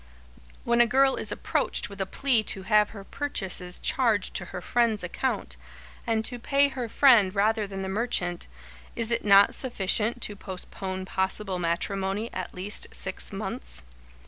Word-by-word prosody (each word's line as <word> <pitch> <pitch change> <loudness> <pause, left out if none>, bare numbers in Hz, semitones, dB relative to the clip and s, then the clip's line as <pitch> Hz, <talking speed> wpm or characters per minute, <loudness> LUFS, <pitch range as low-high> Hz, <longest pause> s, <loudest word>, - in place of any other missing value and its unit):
When 235 0 +3
a 240 - +5
girl 265 +3 +3
is - - -3
approached - - -1
with 200 -1 -8
a 190 - -1
plea 260 -2 +2
to 190 - -1
have 210 +1 +3
her 200 -3 -10
purchases 190 -9 -3
charged 225 -7 +1
to 175 - +4
her 180 - -7
friend's 225 +1 +1
account, 255 +9 -3 0.5
and 220 -1 +1
to 245 +1 -4
pay 280 +4 +2
her 250 -4 -5
friend 215 -8 +5
rather 215 +1 +2
than 195 -1 -5
the - - -3
merchant, 190 -4 -2 0.5
is 230 0 -1
it 235 - 0
not 200 -1 +6
sufficient 230 -1 0
to 205 - -3
postpone 190 0 -6
possible 190 0 -1
matrimony 195 +5 -2
at 185 -1 -5
least 190 +3 -2
six - - 0
months? - - -3
205 Hz, 160 wpm, -27 LUFS, 190-235 Hz, 0.5 s, not